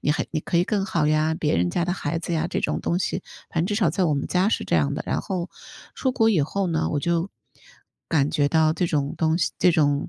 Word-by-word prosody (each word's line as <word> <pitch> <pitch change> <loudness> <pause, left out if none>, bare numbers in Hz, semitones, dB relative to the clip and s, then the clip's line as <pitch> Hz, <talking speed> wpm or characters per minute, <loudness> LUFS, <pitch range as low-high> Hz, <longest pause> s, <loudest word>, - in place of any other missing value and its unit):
你 150 - +1
还 - - -2
你 - - -1
可 170 - -2
以 175 - +4
更 200 -2 0
好 155 -5 +1
呀， 155 +1 +2
别 150 -2 0
人 90 +1 +1
家 175 - 0
的 175 - -1
孩 165 -3 -2
子 170 - -4
呀， 160 - 0
这 - - -2
种 - - -1
东 175 - 0
西， 185 0 -2 0.3
反 165 - 0
正 - - -1
至 205 - -1
少 195 -8 +2
在 180 +3 0
我 155 -3 +2
们 140 - -2
家 185 +3 +2
是 - - 0
这 - - +1
样 75 -3 +1
的。 - - -4
然 - - 0
后 180 -2 -4 0.4
出 260 -2 -1
国 225 -3 +3
以 185 -8 +3
后 195 +6 -1
呢， 160 -1 0
我 145 - -1
就 170 +4 0 0.8
感 150 -3 +2
觉 145 -1 +2
到 155 +1 +3
这 175 +2 0
种 145 -4 -1
东 160 0 +2
西 - - +1
这 180 - +4
种， 145 -3 +1
165 Hz, 290 characters per minute, -24 LUFS, 150-180 Hz, 0.8 s, 以